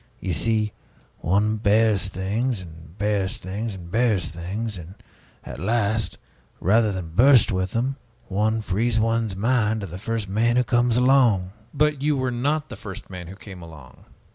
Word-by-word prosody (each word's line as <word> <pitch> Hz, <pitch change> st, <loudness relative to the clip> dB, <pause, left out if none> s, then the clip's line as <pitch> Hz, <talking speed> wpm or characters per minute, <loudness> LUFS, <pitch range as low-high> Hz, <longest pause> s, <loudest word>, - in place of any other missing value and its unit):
You 95 Hz, -, -2 dB
see, 105 Hz, +5 st, +1 dB, 0.5 s
one 105 Hz, +5 st, +1 dB
bears 105 Hz, -2 st, +3 dB
things 100 Hz, +4 st, -2 dB
and 80 Hz, +1 st, -14 dB
bears 105 Hz, +1 st, 0 dB
things 105 Hz, +2 st, -5 dB
and 85 Hz, -2 st, -10 dB
bears 110 Hz, -5 st, +2 dB
things; 95 Hz, +5 st, -5 dB
and 85 Hz, +3 st, -10 dB, 0.5 s
at 60 Hz, +1 st, -8 dB
last, 110 Hz, +2 st, 0 dB, 0.4 s
rather 110 Hz, +3 st, +3 dB
than 90 Hz, -4 st, -5 dB
burst 125 Hz, +2 st, +6 dB
with 95 Hz, 0 st, -1 dB
them, 130 Hz, +4 st, -1 dB, 0.3 s
one 110 Hz, +3 st, 0 dB
frees 110 Hz, +3 st, 0 dB
one's 115 Hz, -2 st, 0 dB
mind 110 Hz, 0 st, +1 dB
to -, -, -4 dB
the 90 Hz, 0 st, -8 dB
first 115 Hz, 0 st, -3 dB
man 115 Hz, +5 st, +1 dB
who 125 Hz, -, +4 dB
comes 120 Hz, -1 st, +2 dB
along." 125 Hz, -8 st, +4 dB, 0.2 s
"But 150 Hz, -1 st, +1 dB
you 150 Hz, 0 st, +1 dB
were 130 Hz, -1 st, 0 dB
not 145 Hz, +5 st, -1 dB
the -, -, -7 dB
first 95 Hz, -1 st, -9 dB
man 90 Hz, -2 st, -7 dB
who 95 Hz, -, -9 dB
came 95 Hz, -2 st, -11 dB
along. 75 Hz, -6 st, -13 dB
105 Hz, 165 wpm, -24 LUFS, 95-115 Hz, 0.5 s, burst